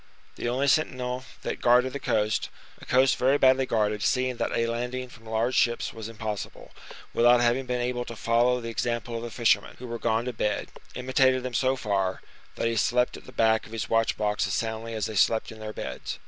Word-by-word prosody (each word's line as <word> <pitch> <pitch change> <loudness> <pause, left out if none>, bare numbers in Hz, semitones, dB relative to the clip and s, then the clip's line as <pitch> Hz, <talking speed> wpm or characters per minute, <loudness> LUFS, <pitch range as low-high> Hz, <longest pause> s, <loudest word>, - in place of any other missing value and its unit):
The 120 - -3
only 130 +3 0
sentinel 130 -4 0 0.2
that - - -4
guarded 125 +2 +4
the 140 - -4
coast 105 -4 0 0.3
(a - - -12
coast 130 +1 +4
very 135 +3 +3
badly 130 -1 +4
guarded, 105 -2 0
seeing 130 +1 +1
that - - -1
a 115 - +1
landing 125 +2 -3
from 115 -2 -15
large 115 +3 0
ships 120 -2 +1
was 110 -1 -7
impossible), 110 -2 -6 0.4
without 120 +1 +5
having 120 +2 +1
been 125 0 -1
able 125 0 -1
to 115 - -7
follow 120 +3 +2
the 115 -1 -6
example 120 0 -2
of 115 - -3
the 120 - -5
fishermen, 110 -3 +1
who 125 - -9
were 115 -1 -5
gone 115 0 0
to 125 - -3
bed, 105 -1 -2 0.3
imitated 130 0 +2
them 130 -1 -4
so 130 +2 +2
far, 100 -6 -1 0.3
that - - -1
he 115 0 -1
slept 125 +3 +2
at - - -12
the - - -11
back 110 -2 +2
of 110 - -13
his 115 - -4
watch 115 0 +2
box 105 -1 0
as - - -1
soundly 115 0 -3
as 110 - -1
they 110 - -5
slept 110 +4 +2
in 110 - -11
their 110 0 -6
beds. - - -6
120 Hz, 220 wpm, -27 LUFS, 110-125 Hz, 0.4 s, without